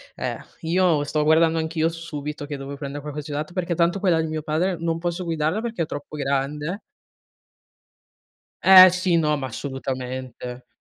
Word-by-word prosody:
Eh, - - -3 0.2
io 165 -2 +2
sto 150 +1 0
guardando 160 +1 +4
anch'io 160 0 0
su 165 0 -9
Subito 150 -2 -5
che 145 -1 -5
dovevo 140 +1 -7
prendere 140 0 -6
qualcosa 150 0 -6
di 150 - -7
usato 150 +4 -4
perché 180 -2 -1
tanto 170 +3 +2
quella 175 -4 +2
di 160 - -2
mio 155 -1 -4
padre 170 +4 0
non 165 0 -1
posso 175 +1 -2
guidarla 165 +4 -1
perché 230 -8 -2
è - - -2
troppo 145 +1 -7
grande. 145 +6 -2 1.9
Eh, 185 -1 +11
sì, 180 -2 +1
no, 150 -2 +2
ma 135 -2 -4
assolutamente. 130 -1 -6
155 Hz, 170 wpm, -23 LUFS, 145-170 Hz, 1.9 s, Eh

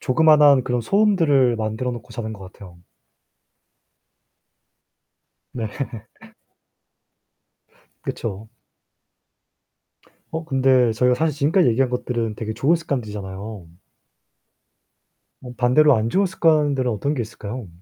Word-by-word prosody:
조그만한 150 -1 +5
그런 125 -1 -1
소음들을 145 - +2
만들어 110 +3 -3
놓고 115 -2 -10
자는 110 -1 -5
것 95 -3 -11
같아요. 90 -4 -14 2.7
네. 115 -3 -4 2.4
그쵸. 110 -1 -6 1.8
어 160 +1 -4
근데 130 -4 +2
저희가 125 +3 +2
사실 155 +1 -1
지금까지 160 +3 +3
얘기한 125 +3 +1
것들은 120 -3 -3
되게 110 0 -5
좋은 140 +9 +2
습관들이잖아요. 105 - -6 1.7
뭐 125 -1 -10
반대로 130 +4 +4
안 110 +1 -1
좋은 195 +9 +2
습관들은 150 -8 +1
어떤게 130 +6 -2
있을까요? 110 0 -7
125 Hz, 240 characters per minute, -21 LUFS, 110-145 Hz, 2.7 s, 조그만한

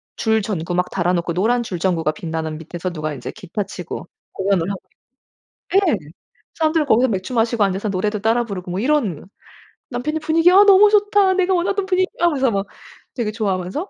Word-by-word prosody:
줄 220 -1 +1
전구 175 -4 -3
막 180 0 0
달아 180 -1 0
놓고 170 -1 -1
노란 235 +7 +1
줄 185 -6 -5
전구가 165 -4 +1
빛나는 160 -1 -5
밑에서 170 +3 -5
누가 155 -2 -4
인제 135 - -7
기타 205 0 -5
치고 180 -2 -7 0.3
공연을 190 -2 0
하고 195 -2 -4 1.0
있 - - +7
예. 290 - +3 0.6
사람들은 315 -1 +1
거기서 250 +1 +4
맥주 195 +4 -3
마시고 225 -1 +2
앉아서 195 +2 -1
노래도 210 +2 -1
따라 225 +3 +2
부르고 185 -5 -6
뭐 180 +2 -2
이런 235 - 0 0.6
남편이 290 +6 -2
분위기 325 +3 +3
"아 390 +2 +8
너무 410 +1 +7
좋다. 410 -2 +3
내가 375 0 +1
원하던 380 +2 0
분위기야." 370 -2 0
하면서 270 -6 +1
막 195 -1 -2 0.5
되게 235 -5 -2
좋아하면서 205 - -3
215 Hz, 395 characters per minute, -20 LUFS, -, 1.0 s, 아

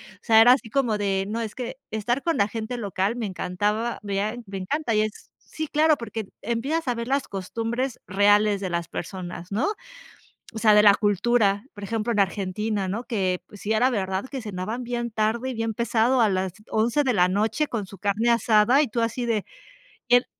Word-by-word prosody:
O - - -27
sea, 225 -1 +6
era 240 +2 +8
así 255 -3 -2
como 240 -4 +1
de, 195 -1 0
no, 225 +3 -3
es 220 -2 -5
que 250 0 -5
estar 240 +5 -1
con 335 -1 0
la 200 - +3
gente 225 +3 -5
local 200 0 -1
me 240 -2 -3
encantaba, 205 +4 -2
mea 205 +2 -1
me 195 -1 -6
encanta 245 +6 -1
y 215 - +4
es. 215 0 -5
Sí, 315 0 -6
claro, 310 +1 +3
porque 225 -3 -5
empiezas 270 +7 -2
a - - +2
ver 235 0 -5
las 275 +1 0
costumbres 230 +6 -3
reales 205 +2 +3
de 190 -2 -3
las 170 -1 -3
personas, 175 0 -6
¿no? 215 - 0 0.9
O - - -7
sea, 215 -1 +5
de 210 - +7
la 205 -1 +8
cultura, 205 0 +2
por 205 - -9
ejemplo, 225 +2 -2
en 215 - 0
Argentina, 200 +1 -1
¿no? 215 +6 -3
Que, 190 -7 -1
pues, 205 - -14
sí 210 - -3
era 230 +4 +3
verdad 190 -3 -2
que 270 -2 -5
cenaban 215 +3 -4
bien 240 -1 -3
tarde 220 +4 0
y - - -5
bien 225 -1 -2
pesado 235 +2 +2
a 220 - +4
las 185 -2 -1 0.2
11 230 +7 +2
de 260 -3 +1
la 180 -4 +4
noche 215 +10 0
con 220 -6 -3
su 195 +1 -12
carne 210 +4 +1
asada 235 +3 +4
y 295 - +1
tú 235 - -3
así 230 +2 -1
de, 220 -3 0 0.6
el 245 +1 +5
220 Hz, 210 wpm, -25 LUFS, 200-240 Hz, 0.9 s, era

